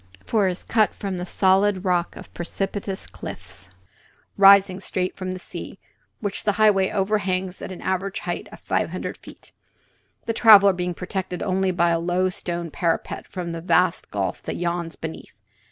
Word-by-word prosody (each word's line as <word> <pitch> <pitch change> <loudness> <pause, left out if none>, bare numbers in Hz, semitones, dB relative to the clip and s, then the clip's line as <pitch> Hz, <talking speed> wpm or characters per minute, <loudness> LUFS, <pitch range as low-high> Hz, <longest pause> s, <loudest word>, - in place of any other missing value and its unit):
For 210 -4 +2
it - - +1
is 180 - -9
cut 220 -2 +2
from 195 -3 -4
the 180 +1 -5
solid 195 +1 +2
rock 175 -2 0
of - - -12
precipitous 195 +2 -4
cliffs 95 - -9 0.7
rising 195 -1 +6
straight 185 -1 -3
from 185 -1 -4
the 185 - -6
sea, - - -8 0.4
which 205 -2 -3
the 205 - +2
highway 200 -2 +4
overhangs 190 -2 -1
at - - -6
an 185 - -8
average 190 +1 -2
height - - -4
of - - -12
five - - 0
hundred - - -5
feet, - - -14 0.7
the 230 - -1
traveller 205 -4 +7
being 180 -1 -3
protected 180 0 -4
only 190 -1 +1
by 175 -1 +2
a 165 - +1
low 180 +2 +1
stone 170 -2 -4
parapet 170 0 -2
from 175 -2 -5
the 165 0 -5
vast 175 - +2
gulf - - -2
that - - -5
yawns 170 -1 -2
beneath. 160 -8 -8
185 Hz, 170 wpm, -23 LUFS, 175-195 Hz, 0.7 s, traveller